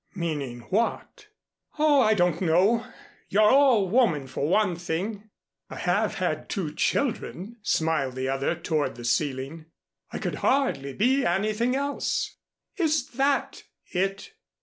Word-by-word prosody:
"Meaning 145 Hz, -9 st, -3 dB
what?" 230 Hz, -, -1 dB, 0.5 s
"Oh, 300 Hz, -2 st, +4 dB
I 220 Hz, -2 st, +4 dB
don't 175 Hz, -3 st, +1 dB
know. 190 Hz, +7 st, +3 dB, 0.4 s
You're 210 Hz, +2 st, +4 dB
all 260 Hz, -8 st, +5 dB
woman, 185 Hz, -, +2 dB
for 130 Hz, +2 st, -3 dB
one 190 Hz, -1 st, +2 dB
thing." 195 Hz, +6 st, -4 dB, 0.4 s
"I -, -, -8 dB
have -, -, 0 dB
had -, -, -2 dB
two 175 Hz, -8 st, -3 dB
children," 230 Hz, -, -2 dB
smiled 160 Hz, -9 st, 0 dB
the 130 Hz, 0 st, -2 dB
other 135 Hz, +5 st, 0 dB
toward 155 Hz, -7 st, -1 dB
the 120 Hz, 0 st, -9 dB
ceiling. 140 Hz, +4 st, -1 dB, 0.4 s
"I -, -, -5 dB
could -, -, -3 dB
hardly 145 Hz, -, +1 dB
be 260 Hz, -, +2 dB
anything 215 Hz, +7 st, +1 dB
else." 280 Hz, +1 st, -2 dB, 0.4 s
"Is 310 Hz, -7 st, +1 dB
that 275 Hz, +2 st, 0 dB, 0.3 s
it?" 195 Hz, -, -2 dB
195 Hz, 130 wpm, -26 LUFS, 155-240 Hz, 0.5 s, all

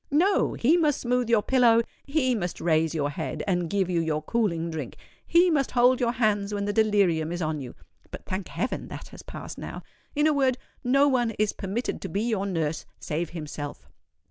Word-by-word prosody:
No—he 320 Hz, -, +3 dB
must 305 Hz, -4 st, +2 dB
smooth 245 Hz, -1 st, 0 dB
your 225 Hz, -3 st, +4 dB
pillow—he 255 Hz, +3 st, +2 dB
must 180 Hz, -7 st, -3 dB
raise 160 Hz, -1 st, +1 dB
your 145 Hz, -2 st, 0 dB
head, 150 Hz, +2 st, -4 dB
and 175 Hz, -4 st, 0 dB
give 195 Hz, -1 st, +1 dB
you 175 Hz, -2 st, 0 dB
your 155 Hz, -2 st, -1 dB
cooling 170 Hz, -5 st, 0 dB
drink—he 340 Hz, -, 0 dB
must 280 Hz, -4 st, +1 dB
hold 250 Hz, +1 st, +4 dB
your 240 Hz, -2 st, +1 dB
hands 210 Hz, -4 st, +1 dB
when 200 Hz, 0 st, -2 dB
the 205 Hz, -, -1 dB
delirium 200 Hz, -7 st, +2 dB
is 175 Hz, -, -3 dB
on 155 Hz, -2 st, -1 dB
you 125 Hz, -, -8 dB, 0.3 s
(but, -, -, -9 dB
thank 185 Hz, 0 st, -4 dB
heaven! 250 Hz, -, -3 dB
that -, -, -8 dB
has -, -, -11 dB
passed -, -, -8 dB
now);—in 295 Hz, 0 st, -5 dB
a 310 Hz, -, +4 dB
word, 265 Hz, -3 st, +2 dB, 0.3 s
no 275 Hz, +3 st, +4 dB
one 250 Hz, -4 st, +2 dB
is 215 Hz, -1 st, +1 dB
permitted 200 Hz, +6 st, -3 dB
to -, -, -5 dB
be 200 Hz, +2 st, -1 dB
your 215 Hz, -4 st, 0 dB
nurse 165 Hz, -4 st, -2 dB
save 160 Hz, +2 st, -3 dB
himself." 150 Hz, -3 st, -7 dB
205 Hz, 185 wpm, -26 LUFS, 165-250 Hz, 0.3 s, your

